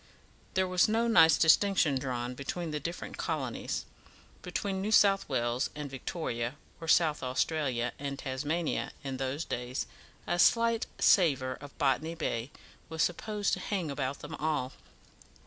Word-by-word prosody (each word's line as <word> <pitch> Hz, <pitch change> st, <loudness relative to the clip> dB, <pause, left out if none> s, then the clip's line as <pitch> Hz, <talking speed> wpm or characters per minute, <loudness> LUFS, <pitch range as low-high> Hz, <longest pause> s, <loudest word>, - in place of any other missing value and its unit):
There 190 Hz, 0 st, +2 dB
was 180 Hz, -1 st, +3 dB
no 230 Hz, +2 st, +2 dB
nice 165 Hz, -8 st, +6 dB
distinction 160 Hz, -4 st, +4 dB
drawn 125 Hz, -2 st, -3 dB
between 155 Hz, +6 st, -4 dB
the 150 Hz, -, -2 dB
different 170 Hz, +4 st, -6 dB
colonies; -, -, -3 dB, 0.6 s
between 195 Hz, -2 st, -3 dB
New 210 Hz, +2 st, -2 dB
South 195 Hz, -4 st, +5 dB
Wales 120 Hz, -1 st, 0 dB
and 150 Hz, -2 st, -6 dB
Victoria, 130 Hz, -3 st, -3 dB, 0.2 s
or 165 Hz, -, -7 dB
South 160 Hz, -2 st, +4 dB
Australia 130 Hz, -2 st, 0 dB
and 140 Hz, -1 st, -4 dB
Tasmania 145 Hz, +5 st, -2 dB
in 135 Hz, -1 st, -4 dB
those 135 Hz, +4 st, -2 dB
days 125 Hz, +1 st, -3 dB, 0.4 s
a 175 Hz, -, -1 dB
slight 230 Hz, +4 st, +4 dB
savour 135 Hz, -8 st, +4 dB
of 145 Hz, 0 st, -12 dB
Botany 150 Hz, +4 st, +1 dB
Bay 125 Hz, -6 st, -2 dB, 0.4 s
was 160 Hz, -1 st, 0 dB
supposed 205 Hz, +3 st, -1 dB
to -, -, 0 dB
hang 185 Hz, -5 st, -2 dB
about 140 Hz, -1 st, -3 dB
them 150 Hz, +2 st, -8 dB
all. 150 Hz, -4 st, -1 dB
150 Hz, 145 wpm, -30 LUFS, 130-175 Hz, 0.6 s, nice